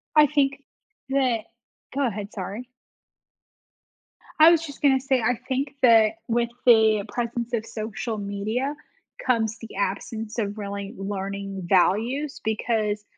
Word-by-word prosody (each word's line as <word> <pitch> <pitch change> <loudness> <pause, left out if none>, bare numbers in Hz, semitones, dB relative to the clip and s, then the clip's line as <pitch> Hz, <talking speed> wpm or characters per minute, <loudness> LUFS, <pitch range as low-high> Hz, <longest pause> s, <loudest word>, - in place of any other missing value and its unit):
I 300 -1 +7
think 275 -1 +1 0.5
that 260 -4 +2 0.5
Go 280 -1 +2
ahead, 205 -2 -5
sorry. 205 +5 -6 1.7
I 315 +1 +10
was 330 -1 +2
just 285 -3 -10
gonna 270 -2 +4
say, 265 -1 +1
I 235 +1 +1
think 275 +1 -2
that 225 -4 +6
with 235 0 +1 0.2
the 220 -3 +5
presence 240 0 -3
of 225 -2 -1
social 220 0 -4
media 210 +8 -2 0.5
comes 225 -3 +1
the 225 - -10
absence 215 +3 -3
of 205 -1 -2
really 200 0 -5
learning 195 0 -4
values 230 +11 +1
because 215 -1 -1
225 Hz, 130 wpm, -25 LUFS, 205-260 Hz, 1.7 s, I